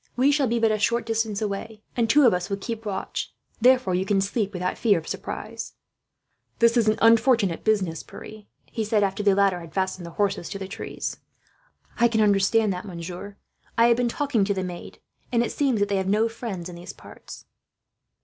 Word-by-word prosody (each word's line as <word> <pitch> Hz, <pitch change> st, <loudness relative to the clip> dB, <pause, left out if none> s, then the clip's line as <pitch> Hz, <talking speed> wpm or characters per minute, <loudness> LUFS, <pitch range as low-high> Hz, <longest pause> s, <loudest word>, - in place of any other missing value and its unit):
We 265 Hz, +3 st, +4 dB
shall 285 Hz, -2 st, +2 dB
be 235 Hz, +1 st, 0 dB
but 225 Hz, -1 st, +3 dB
a 215 Hz, -, 0 dB
short 235 Hz, +2 st, +1 dB
distance 225 Hz, -2 st, -1 dB
away, 210 Hz, +1 st, -5 dB
and 230 Hz, -2 st, +1 dB
two 295 Hz, -2 st, +6 dB
of 235 Hz, -, +6 dB
us 180 Hz, +1 st, -2 dB
will 200 Hz, -, -1 dB
keep 225 Hz, +2 st, -6 dB
watch; 195 Hz, -1 st, -4 dB, 0.3 s
therefore 250 Hz, -5 st, +4 dB
you 180 Hz, +1 st, +1 dB
can 200 Hz, 0 st, +1 dB
sleep 200 Hz, +1 st, -1 dB
without 180 Hz, -1 st, -2 dB
fear 210 Hz, -5 st, +3 dB
of 160 Hz, -, -6 dB
surprise." -, -, -6 dB, 0.8 s
"This 235 Hz, 0 st, +4 dB
is 230 Hz, -3 st, +3 dB
an 215 Hz, -, +1 dB
unfortunate 225 Hz, -5 st, +4 dB
business, 190 Hz, -7 st, 0 dB
Pierre," 215 Hz, -1 st, -11 dB, 0.2 s
he 225 Hz, -, -4 dB
said, 215 Hz, -1 st, +2 dB
after 195 Hz, +1 st, -1 dB
the 200 Hz, -2 st, +3 dB
latter 195 Hz, -2 st, +2 dB
had 165 Hz, -2 st, -12 dB
fastened 190 Hz, -2 st, -2 dB
the 170 Hz, -, -12 dB
horses 200 Hz, -4 st, 0 dB
to 195 Hz, -, -5 dB
the 190 Hz, -1 st, -6 dB
trees. 195 Hz, -, -5 dB, 0.8 s
"I 235 Hz, -, +6 dB
can 230 Hz, -2 st, 0 dB
understand 205 Hz, +1 st, +3 dB
that, 180 Hz, -, -6 dB
monsieur. 180 Hz, +2 st, -8 dB, 0.4 s
I 230 Hz, +1 st, +6 dB
have 235 Hz, -, +4 dB
been 245 Hz, -1 st, +1 dB
talking 275 Hz, -5 st, 0 dB
to 200 Hz, 0 st, 0 dB
the 190 Hz, -, -2 dB
maid, 180 Hz, -1 st, -7 dB, 0.3 s
and 235 Hz, -1 st, +3 dB
it -, -, -3 dB
seems 265 Hz, -6 st, +1 dB
that 205 Hz, -, +2 dB
they 200 Hz, -, 0 dB
have 190 Hz, 0 st, -1 dB
no 215 Hz, +3 st, +3 dB
friends 225 Hz, -6 st, -6 dB
in 180 Hz, -, -9 dB
these 175 Hz, -, -9 dB
parts." -, -, -13 dB
210 Hz, 210 wpm, -25 LUFS, 190-230 Hz, 0.8 s, two